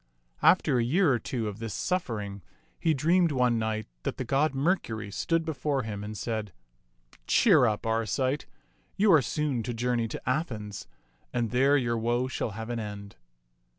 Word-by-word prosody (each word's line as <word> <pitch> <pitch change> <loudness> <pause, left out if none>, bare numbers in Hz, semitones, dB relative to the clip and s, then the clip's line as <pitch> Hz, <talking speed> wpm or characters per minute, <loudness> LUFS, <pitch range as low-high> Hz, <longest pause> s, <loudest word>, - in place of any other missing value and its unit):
After 125 - +4
a - - +2
year 150 +5 +3
or 120 - +1
two 115 -3 -3
of 105 0 -6
this 115 -2 -4
suffering, 105 - -2 0.4
he 160 -2 +2
dreamed 170 +4 +3
one 125 -4 +2
night 110 -1 -2 0.2
that - - -3
the - - -2
god 135 +3 +1
Mercury 125 - -1
stood 165 - 0
before 145 -3 -1
him 105 -2 -5
and 105 +1 -6
said, 110 -4 -3 0.4
" - - -29
Cheer 165 - +5
up, 105 0 -2
Arcite. 120 +5 0 0.5
You 200 -1 +5
are 155 - +7
soon 140 0 -1
to 120 +1 -4
journey 120 0 0
to - - -6
Athens, 115 - -3 0.4
and 120 -3 -1
there 135 +4 +4
your 120 -3 0
woe 120 +3 0
shall 120 -4 -3
have 115 +1 -5
an 120 - -2
end." 105 -1 -7
120 Hz, 175 wpm, -28 LUFS, 110-140 Hz, 0.5 s, are